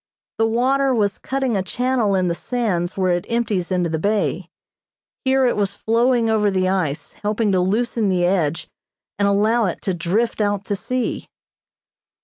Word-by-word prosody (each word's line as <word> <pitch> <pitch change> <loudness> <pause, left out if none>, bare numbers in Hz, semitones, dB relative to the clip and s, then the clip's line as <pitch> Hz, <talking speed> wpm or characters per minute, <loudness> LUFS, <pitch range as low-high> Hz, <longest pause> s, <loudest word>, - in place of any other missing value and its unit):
The 225 - +3
water 260 +3 +2
was 205 -3 0
cutting 265 -3 -1
a 195 - +1
channel 240 +1 0
in 185 -1 +1
the 170 - +1
sands 185 -4 -2
where 185 -1 +2
it 175 +2 -1
empties 210 -7 -1
into 180 -2 +1
the 160 -1 -2
bay. 205 +4 -1 0.8
Here 265 0 +3
it 245 - +2
was 200 -1 -1
flowing 235 +2 +2
over 215 -2 +2
the 185 -1 +1
ice, 175 -7 -2
helping 210 0 0
to 185 - +2
loosen 215 +3 0
the 180 -2 +2
edge 170 -4 0 0.5
and 200 - +3
allow 215 +3 +2
it 180 - -2
to 190 - -1
drift 190 +7 -1
out 205 -1 0
to 205 - -1
sea. 250 +5 -3
205 Hz, 170 wpm, -21 LUFS, 185-235 Hz, 0.8 s, The